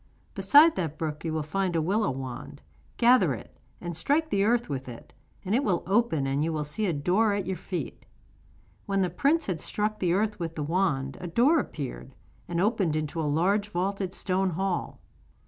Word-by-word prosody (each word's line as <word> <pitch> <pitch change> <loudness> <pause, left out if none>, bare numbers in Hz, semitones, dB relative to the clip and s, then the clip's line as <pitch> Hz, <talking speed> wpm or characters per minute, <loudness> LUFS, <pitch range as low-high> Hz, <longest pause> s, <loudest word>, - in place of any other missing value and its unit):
Beside 285 +12 +6
that 160 -4 -2
brook 155 -1 -4
you 165 - -2
will 155 -1 -1
find 185 +3 -1
a - - +3
willow 200 +7 +1
wand. 135 +2 -7 0.3
Gather 245 +2 +5
it, - - -13 0.2
and 175 -1 -5
strike 295 - 0
the 195 - +2
earth 235 +3 +2
with 135 -3 -4
it, 115 - -11 0.3
and 190 - -1
it 260 +5 +2
will 185 -5 0
open 195 -8 +1
and 135 +2 0
you 165 - 0
will 155 -1 -1
see 175 +9 -2
a - - +1
door 185 +8 +2
at 200 -2 -2
your 190 +1 -2
feet.' 175 -4 -6 0.8
When 195 -1 +1
the 180 -3 0
prince 295 - +2
had 175 -6 -3
struck 215 +1 -2
the 175 -2 +1
earth 210 +2 0
with 165 -1 -4
the 150 - -3
wand 145 -5 0
a 180 - -4
door 255 - +4
appeared, 130 - -6 0.3
and 170 -1 -2
opened 195 -5 +1
into 155 +1 -2
a 150 - 0
large 195 +7 +1
vaulted 190 0 -2
stone 190 0 0
hall. 185 +1 -2
180 Hz, 200 wpm, -27 LUFS, 155-205 Hz, 0.8 s, Beside